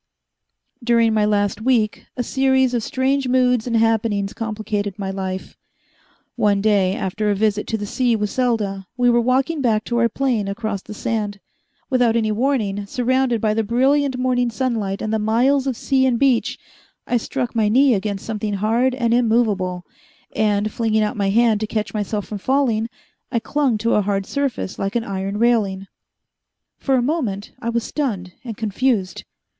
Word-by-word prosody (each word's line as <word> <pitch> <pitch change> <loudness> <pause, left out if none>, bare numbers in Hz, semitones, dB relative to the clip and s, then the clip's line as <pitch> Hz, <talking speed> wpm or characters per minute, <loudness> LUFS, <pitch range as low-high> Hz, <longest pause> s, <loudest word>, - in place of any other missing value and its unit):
During 230 -1 +3
my 215 -1 +2
last 205 0 0
week, 225 -3 +1
a 245 - 0
series 265 -1 +2
of 240 - +1
strange 265 +3 0
moods 250 -2 +2
and 230 -1 +1
happenings 220 -3 +1
complicated 215 -3 -3
my 195 -2 -3
life. 190 -1 -5 0.8
One 210 -4 +2
day, 200 -2 +2
after 210 +3 -2
a 205 - +2
visit 210 0 0
to 225 - -1
the 205 - -4
sea 240 +3 +1
with 210 -1 -2
Selda, 210 -7 -1
we 245 -1 +4
were 240 0 +3
walking 265 +5 +1
back 220 -4 +1
to 240 0 -1
our 235 0 +3
plane 235 -4 0
across 200 0 -3
the 210 - -10
sand. 210 -2 -2 0.5
Without 245 -3 +3
any 220 -2 +1
warning, 210 -4 -1
surrounded 250 0 +1
by 215 -1 +2
the 225 - +1
brilliant 265 +4 +2
morning 250 -1 +1
sunlight 225 -5 -2
and 215 0 -2
the 220 - +1
miles 255 +6 +2
of 255 -4 -1
sea 265 -1 +2
and 245 -2 +1
beach, 260 -2 +2 0.5
I 245 - +1
struck 245 +1 -3
my 215 -2 +2
knee 260 +4 +5
against 200 -1 -2
something 210 -2 -3
hard 230 +6 +1
and 235 -3 +1
immovable, 215 -7 +1 0.5
and, 210 0 +1
flinging 220 -1 +1
out 210 - -2
my 200 -2 0
hand 225 0 +3
to 215 - -2
catch 215 -1 -3
myself 210 -1 -2
from 210 - -6
falling, 240 -2 +1 0.4
I 245 - 0
clung 255 +1 0
to 230 +2 0
a 210 - +3
hard 195 -1 -1
surface 275 -7 -3
like 195 +3 -2
an 235 - +1
iron 195 -1 -3
railing. 210 -5 +1 0.9
For 270 - +1
a 250 - +2
moment 240 -9 -2
I 230 - -2
was 235 -1 0
stunned 210 -13 -3
and 230 -4 -6
confused. 220 -2 -1
225 Hz, 175 wpm, -21 LUFS, 205-250 Hz, 0.9 s, knee